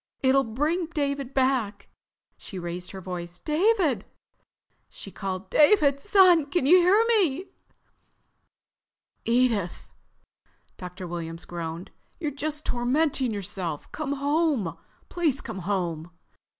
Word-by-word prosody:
It'll 270 +1 +4
bring 300 +10 -1
David 280 -4 -2
back." 255 -7 0 0.5
She 195 - -9
raised 175 0 -5
her 190 - -8
voice. 175 -1 -6
"David!" 315 - +1 0.9
she 195 - -10
called. 190 -1 -5
"David, 295 -4 +5
son! 355 -4 +5
Can 350 -2 0
you 345 +6 +7
hear 390 +6 +4
me?" 375 - +2 1.8
"Edith," 230 -7 0 0.8
Dr. 180 0 -8
Williams 165 -1 -6
groaned. 170 0 -6 0.3
"You're 305 -3 -2
just 300 +2 -3
tormenting 260 +1 0
yourself. 190 -6 -4
Come 295 -2 -3
home. 285 - 0 0.3
Please 315 -6 0
come 220 -4 -7
home." 175 -4 -2
260 Hz, 110 wpm, -26 LUFS, 185-305 Hz, 1.8 s, you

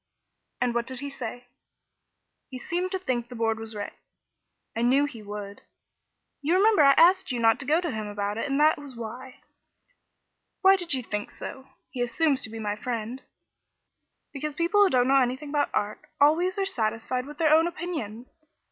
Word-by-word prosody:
"And 245 -1 +1
what 235 0 -1
did 260 0 -4
he 280 0 -5
say?" 245 -2 -7 1.0
"He 260 - -7
seemed 350 +8 -2
to 380 - 0
think 250 -10 -2
the 250 - -8
Board 225 -1 0
was 225 0 -7
right." 205 -1 -5 0.8
"I 230 - -1
knew 265 +4 +4
he 255 -7 -8
would. 205 -1 -7 0.8
You 310 +5 +2
remember 410 -1 +5
I 275 -1 +7
asked 360 +2 +5
you 245 - -2
not 225 -1 +4
to 270 - -3
go 310 +3 +4
to 350 -3 -2
him 215 -2 -4
about 205 +1 -3
it, 280 - -2
and 275 +1 +1
that 305 0 +4
was 280 -3 -10
why." 245 +3 -8 1.2
"Why 385 0 +7
did 350 -6 -2
you 255 - -3
think 210 -2 -4
so? 265 -1 -8 0.2
He 250 - -4
assumes 265 +4 +1
to - - -5
be 225 - -8
my 210 -2 -2
friend." 235 +2 -4 1.1
"Because 295 +1 -4
people 345 +5 +2
who 400 - +6
don't 250 -4 +3
know 270 0 +5
anything 260 +4 -2
about 290 0 +1
art 205 +1 -1 0.2
always 335 +6 +3
are 390 - +1
satisfied 245 - -2
with 295 0 -10
their 310 -1 +4
own 325 +2 +5
opinions. 315 - -6
260 Hz, 190 wpm, -26 LUFS, 230-310 Hz, 1.2 s, I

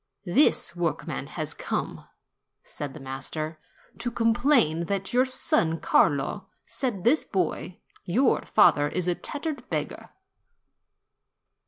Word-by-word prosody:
"This 200 - +3
workman 170 -2 -3
has - - -4
come," - - -4 0.6
said 145 -1 -7
the - - -8
master, 150 +4 -5 0.4
"to 245 - -2
complain 230 - +2
that 195 +1 -2
your 250 +1 +4
son 165 -10 +2
Carlo 140 -2 +1 0.2
said 230 -9 -3
to - - +5
his 310 - +1
boy, 185 -2 -2 0.3
'Your 240 +9 +2
father 145 -8 +4
is 180 +4 -3
a 180 - +3
tattered 295 - -6
beggar.' - - -4
185 Hz, 120 wpm, -26 LUFS, 155-245 Hz, 0.6 s, to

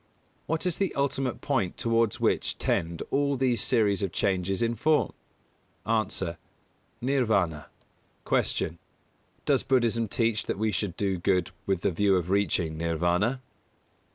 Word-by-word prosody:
What 160 +3 -1
is 180 -3 +1
the 195 -2 -1
ultimate 135 -2 -1
point 115 -11 -1
towards 115 -2 +1
which - - 0
tend 85 0 -1
all 140 0 +1
these 125 -4 +1
series 105 -5 +2
of 100 -3 -1
changes 95 +2 0
in 115 0 +1
form? 150 +7 +2 0.7
A. 110 - -1 1.1
Nirvāna. 110 - +1 0.6
243. - - +1
Q. 85 - -12 0.7
_Does - - +2
Buddhism 115 -3 +2
teach 115 +1 0
that - - -1
we 110 +1 0
should 100 -4 -2
do 95 -3 0
good 90 0 +1 0.2
with 95 -3 +1
the - - +1
view 100 +3 +3
of 90 0 -1
reaching 90 -5 0
Nirvāna? 85 +9 +1
105 Hz, 140 wpm, -27 LUFS, 90-125 Hz, 1.1 s, view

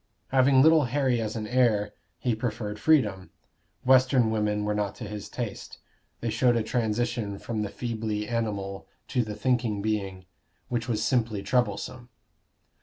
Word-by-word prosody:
Having 130 0 +5
little 160 -2 +6
Harry 130 -2 +1
as 110 0 -3
an 110 -1 -3
heir, 110 -3 +2 0.2
he 125 - 0
preferred 110 -2 -3
freedom. 105 -12 +2 0.6
Western 130 -2 +5
women 105 -1 0
were 105 - 0
not 105 -2 -2
to - - -8
his 105 0 -7
taste; 120 -5 -6 0.4
they 115 - -1
showed 120 +2 +3
a 115 - +1
transition 115 -2 -1
from 110 0 -4
the 105 - -2
feebly 110 -2 -3
animal 100 -4 -3 0.2
to 125 - +1
the 105 -1 -6
thinking 115 -2 0
being, 100 -3 -2 0.4
which 120 -1 -2
was 110 -2 0
simply 115 -6 0
troublesome. 125 +2 -1
115 Hz, 150 wpm, -27 LUFS, 105-125 Hz, 0.6 s, little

